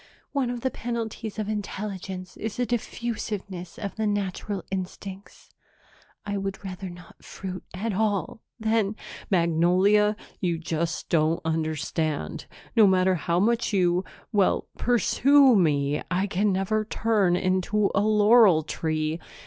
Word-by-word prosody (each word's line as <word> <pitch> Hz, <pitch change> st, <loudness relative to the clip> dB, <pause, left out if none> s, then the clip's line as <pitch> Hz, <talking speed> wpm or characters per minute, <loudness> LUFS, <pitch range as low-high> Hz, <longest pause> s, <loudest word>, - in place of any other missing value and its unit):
One 270 Hz, -4 st, 0 dB
of 245 Hz, -1 st, -4 dB
the 260 Hz, -, 0 dB
penalties 230 Hz, -2 st, -4 dB
of 215 Hz, -2 st, -2 dB
intelligence 195 Hz, -3 st, -5 dB
is 220 Hz, -1 st, -5 dB
a 245 Hz, -, +1 dB
diffusiveness 210 Hz, -6 st, -4 dB
of 200 Hz, -1 st, -5 dB
the 220 Hz, -1 st, 0 dB
natural 205 Hz, -1 st, -2 dB
instincts. 190 Hz, +1 st, -7 dB, 0.7 s
I 205 Hz, -1 st, -2 dB
would 195 Hz, +1 st, -5 dB
rather 190 Hz, 0 st, -6 dB
not 175 Hz, -1 st, -14 dB
fruit 185 Hz, -1 st, -7 dB
at 215 Hz, +3 st, -2 dB
all 205 Hz, -1 st, -1 dB, 0.2 s
than 220 Hz, -2 st, +1 dB, 0.2 s
" -, -, -14 dB
"Magnolia, 185 Hz, +4 st, +3 dB, 0.2 s
you 175 Hz, -3 st, 0 dB
just 165 Hz, 0 st, -3 dB
don't 160 Hz, 0 st, +2 dB
understand. 155 Hz, -, -2 dB, 0.3 s
No 220 Hz, -3 st, +7 dB
matter 185 Hz, 0 st, +4 dB
how 170 Hz, 0 st, 0 dB
much 230 Hz, +2 st, +1 dB
you 180 Hz, -1 st, +2 dB, 0.3 s
well, 205 Hz, -4 st, +2 dB
pursue 260 Hz, +3 st, +4 dB
me, 150 Hz, -5 st, +2 dB
I 185 Hz, +2 st, +1 dB
can 200 Hz, +1 st, +1 dB
never 195 Hz, +3 st, 0 dB
turn 210 Hz, -4 st, +1 dB
into 185 Hz, +3 st, +1 dB
a 200 Hz, -, +3 dB
laurel 210 Hz, -4 st, +5 dB
tree." 155 Hz, +1 st, -2 dB
195 Hz, 135 wpm, -26 LUFS, 175-215 Hz, 0.7 s, No